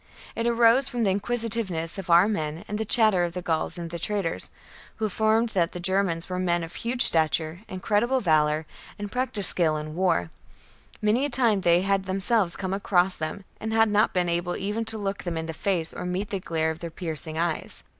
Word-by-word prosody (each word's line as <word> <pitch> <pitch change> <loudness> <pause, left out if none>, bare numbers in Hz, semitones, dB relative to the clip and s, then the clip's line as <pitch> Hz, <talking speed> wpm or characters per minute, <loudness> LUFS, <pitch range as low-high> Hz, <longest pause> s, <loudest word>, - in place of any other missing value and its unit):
It 230 +1 -1
arose 235 +3 +4
from 240 -1 -2
the 195 - +2
inquisitiveness 205 -5 -1
of 190 -1 -8
our 170 +3 +6
men 160 -6 -3
and 210 +1 -4
the 220 - -1
chatter 215 -5 +4
of 170 -1 -2
the 180 - -4
Gauls 160 +1 -1
and 170 -1 -6
the 170 - -5
traders, 195 -2 -1 0.5
who 220 - -2
affirmed 220 +3 +1
that 180 -5 0
the 180 - -6
Germans 185 -2 0
were 180 -1 -3
men 175 -2 0
of 165 - -8
huge 245 +2 -1
stature, 160 +1 +1
incredible 210 +7 0
valour, 155 -5 +2 0.3
and 205 -1 -6
practised 250 -6 +3
skill 160 -3 +1
in 155 0 -6
war: 165 - 0 0.7
many 215 +5 +2
a 290 - 0
time 235 -6 +2
they 175 0 +4
had 195 0 0
themselves 190 0 +2
come 190 -1 -3
across 190 -2 +2
them, 160 +5 -5
and 220 0 -4
had 225 0 +4
not 210 +2 +3
been 180 -2 0
able 175 +1 -1
even 210 +4 -2
to 220 0 -2
look 200 -1 -3
them 175 -2 -4
in 160 - -3
the 160 - -5
face 170 -1 -1
or - - -6
meet 180 +3 -3
the 195 - -1
glare 160 -3 -1
of 160 - -8
their 170 - -5
piercing 160 -2 -6
eyes. 170 -1 -2
190 Hz, 210 wpm, -25 LUFS, 170-215 Hz, 0.7 s, our